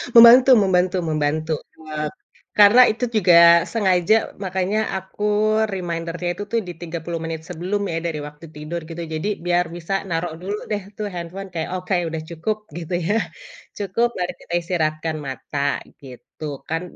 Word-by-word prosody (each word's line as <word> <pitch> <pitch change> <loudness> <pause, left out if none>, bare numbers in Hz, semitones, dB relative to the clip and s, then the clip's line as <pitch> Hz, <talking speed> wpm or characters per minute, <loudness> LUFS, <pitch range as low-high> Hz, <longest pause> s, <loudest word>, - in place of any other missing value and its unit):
Membantu 240 +3 +9
membantu 185 -1 +2
membantu, 155 +1 0 0.3
eee, 150 -1 -3 0.5
karena 210 +5 +8
itu 240 +3 -2
juga 180 -4 +4 0.4
sengaja, 190 -2 +3 0.3
makanya 190 +3 -1 0.2
aku 190 +2 -8 0.5
reminder-nya 170 -1 -3
itu 205 - -6
tuh 230 - +2
di 175 - -5
30 170 0 -5
menit 165 -1 -4
sebelum 180 +4 -2
ya, 165 - -2
dari 155 -2 -3
waktu 150 +2 -12
tidur 155 +3 -5
gitu. 170 +1 -6
Jadi 155 +6 -2 0.2
biar 175 0 +2
bisa 175 +3 -5 0.2
naruh 165 0 -2
dulu 200 +3 -3
deh 205 -1 0 0.2
tuh 210 -1 -3
handphone 180 +3 -6
kayak 160 -1 -3
oke 180 +2 -4 0.2
udah 160 -1 -4
cukup, 210 +6 -2 0.2
gitu 175 +1 -6
ya. 210 - +2 0.6
Cukup 205 +4 +1
baru 180 -1 -2
kita - - -9
istirahatkan 160 -2 -1
mata 140 +1 -2 0.2
gitu 135 +3 -11 0.2
kan 165 +1 -1
175 Hz, 150 wpm, -22 LUFS, 160-195 Hz, 0.6 s, Membantu